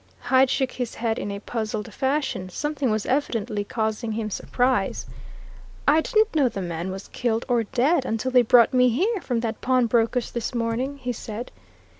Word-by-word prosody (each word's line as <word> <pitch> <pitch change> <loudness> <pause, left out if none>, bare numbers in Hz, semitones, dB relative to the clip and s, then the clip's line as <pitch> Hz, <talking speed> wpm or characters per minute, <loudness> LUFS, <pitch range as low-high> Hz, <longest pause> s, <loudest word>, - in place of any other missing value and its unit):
Hyde 260 0 +3
shook 265 -1 0
his 245 -2 -4
head 225 -1 -1
in - - -4
a 200 - -4
puzzled 220 0 -4
fashion 270 -9 -1
something 290 +5 -2
was 215 -1 0
evidently 230 -6 -1
causing 220 +1 -2
him 215 -1 -3
surprise. 245 -2 0 0.8
"I 305 +2 +5
didn't 435 +4 +2
know 280 -5 +4
the 200 - -6
man 175 -1 -3
was 190 +1 -7
killed, 235 -2 -1
or 240 -3 +1
dead, 270 +8 +2
until 225 +1 -2
they 250 -1 +6
brought 240 +1 +5
me 250 0 +5
here, 380 - 0
from 245 -6 -1
that 225 -1 -3
pawnbroker's 245 -1 +2
this 235 +1 -3
morning!" 235 +4 -1
he 250 -2 -3
said. 230 +2 -7
240 Hz, 175 wpm, -24 LUFS, 220-260 Hz, 0.8 s, they